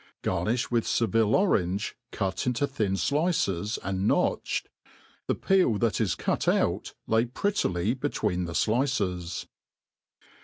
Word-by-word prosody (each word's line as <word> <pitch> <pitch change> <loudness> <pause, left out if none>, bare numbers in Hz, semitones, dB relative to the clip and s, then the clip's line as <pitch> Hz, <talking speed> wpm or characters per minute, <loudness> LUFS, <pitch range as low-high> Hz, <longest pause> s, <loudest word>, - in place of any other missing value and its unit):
Garnifh 105 +9 0
with 120 -2 +1
Seville 115 -2 +2
orange, 100 - +1 0.2
cut 95 +3 -2
into 125 +3 +1
thin 110 -9 -1
flices 105 - 0
and 95 +1 -1
notched - - +1 0.3
\ - - -31
the - - +1
peel 185 - +3
that 115 0 +1
ia 110 - +2
.€u| 85 - 0
out - - -2
lay 115 +1 +2
prettily 115 - 0
between 105 -9 -1
the 85 - -5
flice$. 105 -8 0
110 Hz, 125 wpm, -27 LUFS, 95-125 Hz, 0.3 s, peel